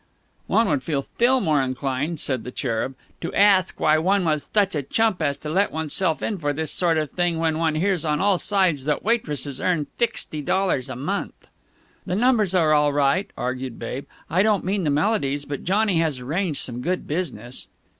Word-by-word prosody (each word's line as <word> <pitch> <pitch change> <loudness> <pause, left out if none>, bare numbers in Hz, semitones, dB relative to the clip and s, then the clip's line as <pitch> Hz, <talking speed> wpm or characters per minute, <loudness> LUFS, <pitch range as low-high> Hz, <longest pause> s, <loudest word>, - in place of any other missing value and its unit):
"One 225 - +3
would 145 -4 +1
feel 140 +1 -2
thtill 250 - +2
more 150 -3 +2
inclined," 135 +4 -2
said 130 -5 -2
the - - -6
Cherub, 125 0 -2 0.3
"to - - -3
athk 195 -2 +4
why 155 0 +4
one 190 +3 +2
was 155 -2 0
thuch 200 -2 +2
a 150 - -1
chump 215 - 0
as 140 -2 0
to 150 - -7
let 195 +5 +2
oneself 160 +2 0
in 205 -4 -2
for 145 -2 -1
this 155 +1 -3
sort 170 -3 +2
of 155 -2 -1
thing 175 -2 0
when 160 -1 0
one 160 -2 +1
hears 185 +1 +1
on 150 -2 0
all 195 -2 +2
sides 185 -9 +2
that 150 -1 0
waitresses 150 - -1
earn 170 -5 +1
thixty 225 -10 -1
dollars 150 -5 0
a 130 - -5
month." 170 +11 -4 0.6
"The 180 - -1
numbers 215 -4 +2
are 160 -4 +4
all 150 -1 +4
right," 145 +7 +1
argued 125 0 -4
Babe. 125 +4 -6 0.2
"I 175 +5 +2
don't 210 -3 +2
mean 190 -1 0
the - - +2
melodies, 145 -3 0
but 145 -1 -5
Johnny 200 -1 +2
has 155 -5 0
arranged 155 +5 -1
some 120 -1 -4
good 180 +6 -2
business." 130 -8 -4
160 Hz, 195 wpm, -23 LUFS, 140-190 Hz, 0.6 s, athk